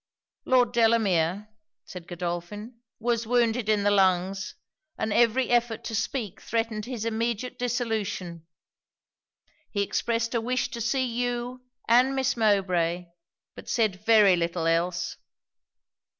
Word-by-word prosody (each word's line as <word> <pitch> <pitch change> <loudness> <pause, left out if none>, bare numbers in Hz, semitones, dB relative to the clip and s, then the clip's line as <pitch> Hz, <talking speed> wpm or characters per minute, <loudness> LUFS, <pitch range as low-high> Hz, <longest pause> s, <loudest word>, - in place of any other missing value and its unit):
'Lord 250 -2 +3
Delamere,' 210 -5 +2 0.4
said 180 -2 -10
Godolphin, 175 +7 -5 0.2
'was 230 -1 -1
wounded 235 -2 +1
in 210 -2 +2
the 205 - +3
lungs, 190 -1 +1 0.4
and 220 - -1
every 240 +3 +3
effort 240 -2 +1
to - - -5
speak 220 -2 -3
threatened 225 -2 -2
his 240 -3 -5
immediate 230 +2 -2
dissolution. 210 -9 -3 1.2
He 200 -2 0
expressed 230 +3 -1
a 235 - +1
wish 250 +3 -1
to 235 - -6
see 260 +3 +1
you 245 +1 -3 0.3
and 250 +4 +4
Miss 265 -2 +1
Mowbray; 180 -6 +1 0.4
but - - -11
said 210 -4 0
very 210 -4 +6
little 170 -1 -2
else.' 170 +2 0
220 Hz, 120 wpm, -26 LUFS, 190-240 Hz, 1.2 s, very